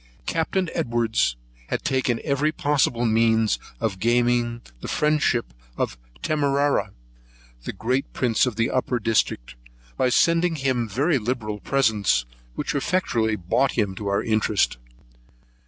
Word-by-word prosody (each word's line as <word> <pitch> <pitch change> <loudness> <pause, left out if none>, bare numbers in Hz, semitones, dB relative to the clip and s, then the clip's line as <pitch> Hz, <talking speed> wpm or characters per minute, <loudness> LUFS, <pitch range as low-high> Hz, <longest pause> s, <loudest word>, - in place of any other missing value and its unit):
Captain 170 +3 0
Edwards 120 - +1 0.3
had - - -3
taken 130 -3 0
every 145 +1 +1
possible 140 -6 +1
means 115 -1 +3 0.2
of 105 -5 -2
gaining 120 +1 +1 0.2
the - - -7
friendship 150 - +1 0.2
of - - -1 0.3
Tamarrah, 145 -1 +1 0.8
the - - -2
great 130 +4 -1
prince 120 0 +1
of 120 - -3
the 115 +1 0
upper 130 -1 0
district, 105 - 0 0.4
by 130 - +2
sending 165 +5 +3
him 130 -5 -1
very 140 - +1
liberal 110 -2 -3
presents, 105 - +1 0.3
which - - -2
effectually 130 -8 0
brought 105 +9 +1
him 105 -4 +1
over - - -10
to 105 - -5
our 100 0 +1
interest. 110 - +1
120 Hz, 130 wpm, -24 LUFS, 110-140 Hz, 0.8 s, means